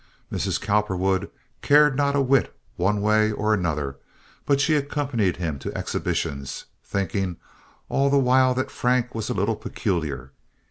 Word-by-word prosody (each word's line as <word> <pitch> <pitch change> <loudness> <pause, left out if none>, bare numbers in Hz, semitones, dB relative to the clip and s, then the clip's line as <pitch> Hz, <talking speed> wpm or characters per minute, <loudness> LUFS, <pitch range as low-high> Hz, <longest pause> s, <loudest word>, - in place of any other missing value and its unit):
Mrs. - - -1
Cowperwood 95 -2 0 0.3
cared 150 -1 +5
not 140 0 +1
a 140 - +3
whit 135 0 +2 0.2
one 100 +3 +1
way 110 +1 +3
or 105 +1 0
another, 75 -8 -1 0.5
but 140 -1 +3
she 150 +3 +3
accompanied 140 - 0
him 80 -5 -3
to - - -5
exhibitions, 70 -1 -3 0.2
thinking 95 -2 -2 0.5
all 140 +1 +2
the 140 - +3
while 130 -1 +4
that 130 - -2
Frank 125 -1 0
was 110 -1 -4
a - - -1
little 105 +4 +1
peculiar. 75 - -3
105 Hz, 145 wpm, -24 LUFS, 90-130 Hz, 0.5 s, cared